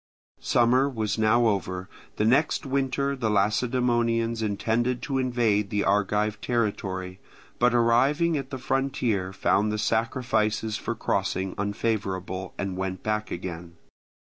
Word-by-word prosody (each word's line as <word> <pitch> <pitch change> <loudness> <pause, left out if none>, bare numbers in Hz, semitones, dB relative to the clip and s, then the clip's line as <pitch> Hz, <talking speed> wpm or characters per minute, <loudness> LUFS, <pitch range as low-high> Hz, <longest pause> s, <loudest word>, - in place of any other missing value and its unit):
Summer 125 +3 +3
was 110 -4 -2
now 115 +2 +4
over. 95 -3 -1 0.3
The 105 - 0
next 140 +7 +2
winter 140 +1 0
the 120 -5 -1
Lacedaemonians 115 +2 +1
intended 115 +4 0
to 135 -2 -1
invade 115 -5 +1
the 105 0 0
Argive 105 +1 +1
territory, 95 -6 -2 0.4
but 120 0 +3
arriving 135 +8 +3
at 135 -2 -3
the 130 - -5
frontier 125 -8 -1
found 105 +2 +1
the 105 - -1
sacrifices 110 0 0
for - - -3
crossing 95 0 -1
unfavourable, 100 -3 -3
and 100 -2 -3
went 95 0 -3
back 105 0 -1
again. 85 -1 -6
110 Hz, 125 wpm, -26 LUFS, 100-125 Hz, 0.4 s, now